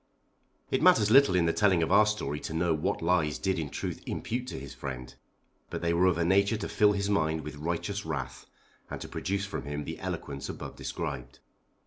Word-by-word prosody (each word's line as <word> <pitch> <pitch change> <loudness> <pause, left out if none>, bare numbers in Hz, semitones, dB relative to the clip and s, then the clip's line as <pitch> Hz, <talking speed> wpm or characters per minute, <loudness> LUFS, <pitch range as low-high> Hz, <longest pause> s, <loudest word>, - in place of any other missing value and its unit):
It - - +1
matters 105 -1 +5
little 135 -7 +7
in 85 -2 +3
the 85 - +2
telling 95 -5 +3
of 80 - -1
our 105 +2 +6
story 75 -9 -2
to 80 - -5
know 85 0 +2
what 75 +1 -1
lies 85 -3 +2
Dick 95 -1 0
did - - 0
in 75 - -4
truth - - -4
impute 125 +2 -3
to - - -5
his 70 0 -8
friend; 65 -2 -6 0.6
but - - -5
they 85 0 +2
were 90 +2 +4
of 90 - +2
a 85 - +1
nature 100 +4 +3
to 100 - -4
fill 105 -1 +4
his 100 0 -1
mind 80 -6 +1
with 75 0 -8
righteous 85 +6 -2
wrath 70 -7 -5 0.4
and - - -5
to - - -6
produce 100 +1 -2
from 100 - -5
him 75 +1 -4
the - - -6
eloquence 70 -1 -5
above - - -7
described. - - -5
85 Hz, 215 wpm, -29 LUFS, 75-100 Hz, 0.6 s, little